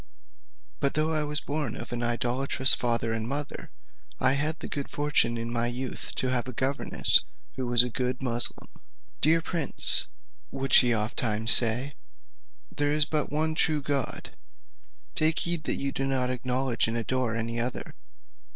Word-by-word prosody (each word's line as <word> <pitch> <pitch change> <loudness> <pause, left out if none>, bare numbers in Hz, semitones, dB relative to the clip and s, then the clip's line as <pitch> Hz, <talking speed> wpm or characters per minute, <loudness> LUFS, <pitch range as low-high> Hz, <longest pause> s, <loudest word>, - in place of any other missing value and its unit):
"But 140 - 0
though 155 +1 +1
I 155 -1 +1
was 150 +1 0
born 145 -5 -3
of - - -8
an 120 - -3
idolatrous 125 +2 +3
father 115 -2 0
and 115 0 -2
mother, 145 +2 -4 0.5
I - - +3
had 150 +3 -2
the - - -7
good 140 -1 -5
fortune 145 -5 +1
in 115 +1 -4
my 120 0 0
youth 125 +2 -5
to 130 - -1
have 125 -1 -1
a 130 - -6
governess 135 +4 +2 0.4
who 130 -2 -4
was 120 0 +5
a 125 - -3
good 125 +1 -2
Moosulmaun. 120 -2 +2 0.5
'Dear 160 +2 +3
prince,' 165 -4 0 0.4
would 135 -1 -4
she 120 -2 +6
oftentimes 110 +1 +2
say, 120 +4 +4 0.8
'there 145 0 0
is 150 0 +2
but 150 -3 -2
one 155 +2 0
true 155 -2 +1
God; 140 -3 -2 0.8
take 155 +1 +2
heed 170 -2 -1
that - - +1
you 140 0 -2
do 135 0 -2
not 130 -2 0
acknowledge 125 -1 -1
and 115 +1 -2
adore 120 0 -2
any 115 +1 -3
other.' 120 +1 -4
130 Hz, 165 wpm, -27 LUFS, 120-145 Hz, 0.8 s, she